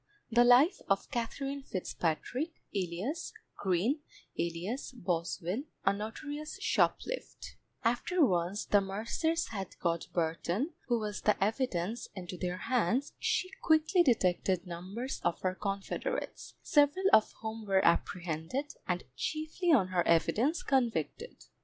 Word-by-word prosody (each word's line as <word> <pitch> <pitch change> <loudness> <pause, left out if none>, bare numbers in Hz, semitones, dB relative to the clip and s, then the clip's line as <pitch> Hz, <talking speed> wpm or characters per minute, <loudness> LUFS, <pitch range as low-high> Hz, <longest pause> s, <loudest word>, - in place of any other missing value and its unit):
The 240 +1 +6
Life 245 +9 +6
of 195 0 +1
KATHERINE 275 +4 -3
FITZPATRICK, 225 - -2 0.2
alias 195 - -3 0.3
GREEN, 200 - +1 0.4
alias 180 - -3
BOSWELL, 180 - -2 0.2
a 195 - +5
notorious 290 - -5
Shoplift 475 +3 -1 0.3
After 250 +9 +3
once 180 0 0
the 205 - +4
mercers 230 - -1
had 195 -4 -6
got 170 -1 -1
Burton, 175 - -1
who 240 -2 +2
was 210 -2 -3
the 210 - +4
evidence, 220 -2 -1
into 180 -1 -6
their 180 0 -3
hands, 250 +4 0
she 370 - 0
quickly 320 +3 +4
detected 185 - +2
numbers 185 +9 -5
of 175 - +1
her 185 -1 +1
confederates, 195 0 -4
several 295 +4 +3
of 215 - +6
whom 220 -1 -5
were 190 -1 +3
apprehended, 175 - 0
and 180 -1 -1
chiefly 315 +3 -1
on 205 -12 +5
her 180 -1 +2
evidence, 225 - +2
convicted. 240 - -1
215 Hz, 120 wpm, -32 LUFS, 180-275 Hz, 0.4 s, The